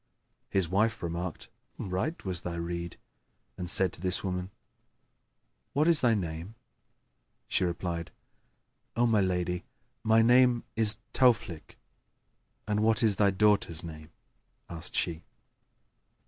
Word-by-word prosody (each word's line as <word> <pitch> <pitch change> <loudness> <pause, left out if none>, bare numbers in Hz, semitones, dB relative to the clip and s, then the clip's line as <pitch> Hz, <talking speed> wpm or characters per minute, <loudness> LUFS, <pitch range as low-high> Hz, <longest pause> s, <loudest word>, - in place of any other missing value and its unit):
His 95 -3 +1
wife 105 +4 +1
remarked, 85 0 -4 0.3
"Right 95 - -3
was 90 -2 -1
thy 85 -1 -4
rede", 85 0 -4 0.6
and 90 +5 -5
said 95 0 +2
to - - -10
the 90 0 0
woman 90 -1 -3 1.2
"What 150 +3 +2
is 170 -3 +4
thy 120 -3 +4
name?" 85 +2 -4 0.9
She - - +1
replied, 85 -1 -3 0.9
"O 120 +2 +3
my 110 -3 +3
lady, 90 -1 -1 0.4
my 110 0 +5
name 125 0 +5
is 110 -2 +3 0.2
Tauflнk.[FN#3]" 110 -11 +2 0.9
"And 105 0 +1
what 110 +1 +2
is 105 -4 +3
thy 100 -1 +4
daughter's 100 -4 +2
name?" 80 -2 -9 0.6
asked 85 -1 -6
she? 85 -2 -1
95 Hz, 120 wpm, -29 LUFS, 85-110 Hz, 1.2 s, my